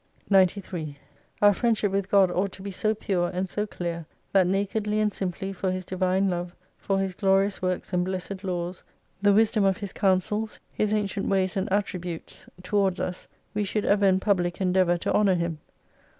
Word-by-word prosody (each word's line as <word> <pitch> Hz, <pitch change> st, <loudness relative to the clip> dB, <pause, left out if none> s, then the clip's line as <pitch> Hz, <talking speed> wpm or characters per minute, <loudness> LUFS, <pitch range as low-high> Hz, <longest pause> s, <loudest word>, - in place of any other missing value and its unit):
93 185 Hz, -6 st, +1 dB, 0.5 s
Our 205 Hz, 0 st, +7 dB
friendship 220 Hz, -2 st, +1 dB
with 195 Hz, 0 st, -1 dB
God 195 Hz, -3 st, +5 dB
ought 190 Hz, +2 st, 0 dB
to 190 Hz, -, -10 dB
be 200 Hz, -, -5 dB
so 215 Hz, +3 st, 0 dB
pure 180 Hz, -4 st, -1 dB
and 185 Hz, +1 st, -2 dB
so 210 Hz, +4 st, -2 dB
clear, 170 Hz, -4 st, -5 dB, 0.3 s
that 190 Hz, -2 st, +5 dB
nakedly 205 Hz, +2 st, 0 dB
and 210 Hz, -1 st, +1 dB
simply 195 Hz, +1 st, -3 dB
for 190 Hz, 0 st, -2 dB
His 185 Hz, 0 st, -4 dB
Divine 185 Hz, +1 st, +1 dB
Love, 175 Hz, -1 st, -3 dB, 0.2 s
for 195 Hz, -, 0 dB
His 195 Hz, -1 st, -1 dB
glorious 195 Hz, +1 st, +2 dB
works, 185 Hz, 0 st, -2 dB
and 180 Hz, 0 st, +2 dB
blessed 185 Hz, +1 st, -4 dB
laws, 180 Hz, -1 st, -3 dB, 0.4 s
the 205 Hz, 0 st, +5 dB
wisdom 220 Hz, +1 st, +3 dB
of 195 Hz, -1 st, +3 dB
His 200 Hz, -3 st, -6 dB
counsels, 210 Hz, +3 st, 0 dB, 0.2 s
His 210 Hz, -1 st, 0 dB
ancient 205 Hz, -1 st, -1 dB
ways 190 Hz, -2 st, +1 dB
and 190 Hz, +1 st, -2 dB
attributes 180 Hz, -4 st, -3 dB, 0.2 s
towards 195 Hz, -1 st, +1 dB
31* -, -, -2 dB
us, 180 Hz, -, -5 dB, 0.3 s
we 210 Hz, -, 0 dB
should 205 Hz, +1 st, -1 dB
ever 200 Hz, 0 st, +4 dB
in 190 Hz, 0 st, +4 dB
public 180 Hz, -4 st, 0 dB
endeavour 185 Hz, -2 st, +2 dB
to -, -, -2 dB
honour 200 Hz, -3 st, +4 dB
Him. 170 Hz, -2 st, -2 dB
190 Hz, 185 wpm, -26 LUFS, 180-205 Hz, 0.5 s, Our